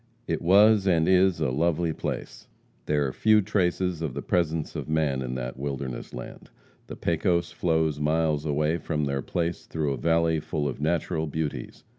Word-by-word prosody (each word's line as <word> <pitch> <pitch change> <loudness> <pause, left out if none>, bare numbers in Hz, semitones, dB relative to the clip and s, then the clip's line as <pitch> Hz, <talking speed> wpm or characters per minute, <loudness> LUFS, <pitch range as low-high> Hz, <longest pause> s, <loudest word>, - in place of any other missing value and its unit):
It - - -2
was 100 +3 +5
and 80 -3 +3
is 95 -1 +4
a 65 - 0
lovely 85 +3 +1
place. - - -5 0.4
There 75 -1 +2
are 65 - -3
few 110 0 +4
traces 90 -3 0
of 75 -6 -3
the - - -4
presence 80 -3 -1
of - - -5
man 75 -4 +1
in 65 -1 -4
that 60 0 -5
wilderness 70 -3 -4
land. - - -9 0.4
The - - -7
Pecos 85 +1 0
flows 80 -3 0
miles 75 0 +1
away 75 +2 0
from 75 -2 -2
their 70 -1 -1
place 85 +5 -3
through 75 -3 -1
a - - -4
valley 80 +3 +2
full 75 -1 -2
of 70 +1 -5
natural 80 0 0
beauties. 75 0 -4
80 Hz, 175 wpm, -26 LUFS, 75-85 Hz, 0.4 s, was